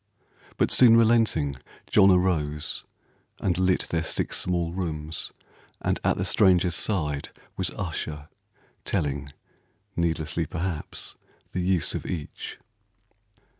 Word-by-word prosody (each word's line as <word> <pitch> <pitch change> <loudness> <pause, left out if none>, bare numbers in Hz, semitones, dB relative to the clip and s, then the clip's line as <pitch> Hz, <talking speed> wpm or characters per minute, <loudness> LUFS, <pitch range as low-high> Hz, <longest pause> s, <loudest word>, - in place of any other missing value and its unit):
But - - +2
soon 115 -3 +7
relenting, 110 - +3 0.3
John 100 -2 +5
arose, 80 -6 +1 0.5
and 90 -3 +1
lit 95 0 +3
Their 85 - 0
six 80 - -1
small 85 -2 0
rooms, 80 -3 -3 0.5
and - - 0
at - - +2
the - - -1
stranger's 90 -2 +4
side 75 -7 -1 0.3
Was - - 0
usher, 80 -4 -5 0.6
telling, 70 -1 -2 0.6
needlessly 80 -3 -1
perhaps, 85 -2 -4 0.4
The 90 - -2
use 90 -2 +1
of - - -4
each. 80 -5 -5
85 Hz, 110 wpm, -26 LUFS, 75-95 Hz, 0.6 s, soon